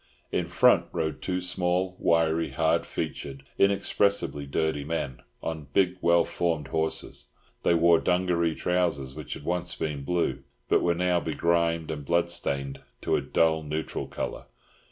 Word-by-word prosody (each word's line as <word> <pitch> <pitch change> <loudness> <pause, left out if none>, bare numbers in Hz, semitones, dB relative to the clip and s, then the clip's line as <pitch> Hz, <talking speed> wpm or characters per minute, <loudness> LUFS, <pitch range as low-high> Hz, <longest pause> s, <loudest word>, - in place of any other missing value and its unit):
In - - 0
front - - +4
rode 80 -1 -2
two 90 -1 -1
small, 90 +1 0
wiry, 80 -1 +2
hard 80 +1 +1
featured, 70 -1 -5 0.2
inexpressibly 100 -6 +1
dirty 80 0 0
men 70 -5 -3 0.2
on 80 -3 -4
big 95 -2 +3
well 85 0 +5
formed 80 -5 -1
horses. 80 +2 -2 0.3
They 85 - +3
wore 85 0 +5
dungaree 90 -2 +1
trousers, 85 -7 0
which 75 +1 -6
had - - -10
once 90 0 -2
been 75 -3 -3
blue, 85 +4 0 0.3
but - - +3
were 85 -1 +2
now 90 0 +2
begrimed 85 -1 0
and 75 -2 -5
bloodstained 70 -4 0 0.2
to - - +2
a - - +1
dull 80 -1 +2
neutral 75 +1 -4
colour. - - -5
85 Hz, 145 wpm, -27 LUFS, 75-90 Hz, 0.3 s, well